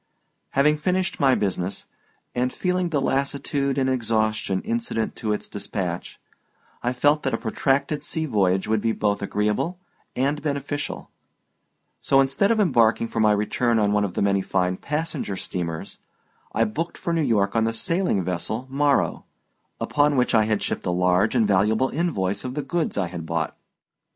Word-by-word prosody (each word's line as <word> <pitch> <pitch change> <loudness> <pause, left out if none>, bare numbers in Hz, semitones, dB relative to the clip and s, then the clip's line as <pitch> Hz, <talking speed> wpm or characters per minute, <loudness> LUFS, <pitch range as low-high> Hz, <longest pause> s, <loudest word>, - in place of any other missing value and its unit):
Having 150 +3 +4
finished 185 +4 -1
my 135 -4 +4
business, 95 -1 -2 0.5
and 125 +1 0
feeling 180 +2 0
the 150 -4 +1
lassitude 140 0 -1
and 130 -1 +2
exhaustion 110 -5 0
incident 225 - -2
to 110 - -2
its 105 - -2
dispatch, 95 -3 -4 0.6
I 120 - 0
felt 145 +4 +3
that 135 -4 0
a - - -2
protracted 135 +6 0
sea 160 +2 -2
voyage 95 -8 +1
would 110 -1 +1
be 115 0 +1
both 105 -2 0
agreeable 105 - -1 0.4
and 140 +3 0
beneficial, 145 -1 -3 0.9
so 135 - +3
instead 135 +8 +2
of 230 -1 +2
embarking 115 - +3
for 115 - -3
my 110 -1 +5
return 115 +3 +1
on 105 -2 +2
one 105 0 +2
of 100 -3 -3
the - - +1
many 100 -1 +2
fine 90 -1 0
passenger 150 - -3
steamers 85 -3 -5 0.5
I 115 - +2
booked 150 +11 -3
for 170 - -2
New 165 - +2
York 105 -8 +1
on 110 -1 +3
the 115 - +1
sailing 165 - 0
vessel 90 +7 -3
Morrow, 140 0 +1 0.5
upon 145 0 +2
which 125 -1 +2
I 110 -2 +5
had 105 -1 0
shipped - - -3
a - - +1
large 90 +5 +2
and 115 -4 +3
valuable 105 +6 +2
invoice 135 - -1
of 125 0 -5
the 150 - -2
goods 165 +4 -2
I 95 - +1
had 85 -2 -6
bought. 80 -1 -2
115 Hz, 170 wpm, -24 LUFS, 100-145 Hz, 0.9 s, my